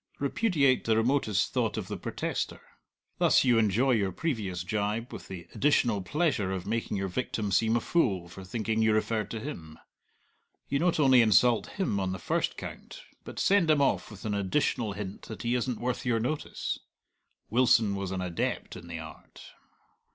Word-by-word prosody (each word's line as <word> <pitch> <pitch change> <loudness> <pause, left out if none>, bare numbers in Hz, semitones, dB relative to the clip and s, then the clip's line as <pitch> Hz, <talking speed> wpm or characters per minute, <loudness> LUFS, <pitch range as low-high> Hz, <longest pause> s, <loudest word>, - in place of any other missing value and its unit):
Repudiate 140 - +2
the 110 -1 +3
remotest 115 -4 +1
thought - - 0
of - - -4
the - - -4
protester. - - -3 0.6
Thus - - +5
you 120 -3 +4
enjoy 115 +5 +2
your 100 -5 +2
previous 100 - -2
gibe, 105 +5 -2
with - - -8
the 90 -3 -8
additional 120 -8 +2
pleasure 105 - 0
of 95 -2 -3
making 110 0 -2
your 95 0 -1
victim 105 0 -2
seem 110 +4 +3
a - - +3
fool 100 - +1
for 95 +2 -10
thinking 110 +3 -1
you 110 -1 +4
referred 110 -1 0
to 115 - -4
him. 85 - -7 0.9
You 140 - 0
not 175 -1 +2
only 130 -4 +6
insult 115 +2 +4
him 185 - 0
on 95 -1 -1
the - - -4
first - - -1
count, - - -8 0.2
but - - -10
send 195 -4 +3
him 155 -2 +5
off 140 - +1
with 105 -1 -11
an 105 - -1
additional 100 +2 0
hint 100 -1 -6
that 110 - -7
he 120 +1 0
isn't 125 -1 -1
worth 125 0 -2
your 120 -3 +1
notice. 145 +7 -3 0.7
Wilson 115 -3 +4
was 100 -1 -3
an 95 0 -3
adept 90 -2 -3
in 85 -2 -10
the 85 -1 -5
art. 80 -1 -11
110 Hz, 180 wpm, -29 LUFS, 95-130 Hz, 0.9 s, only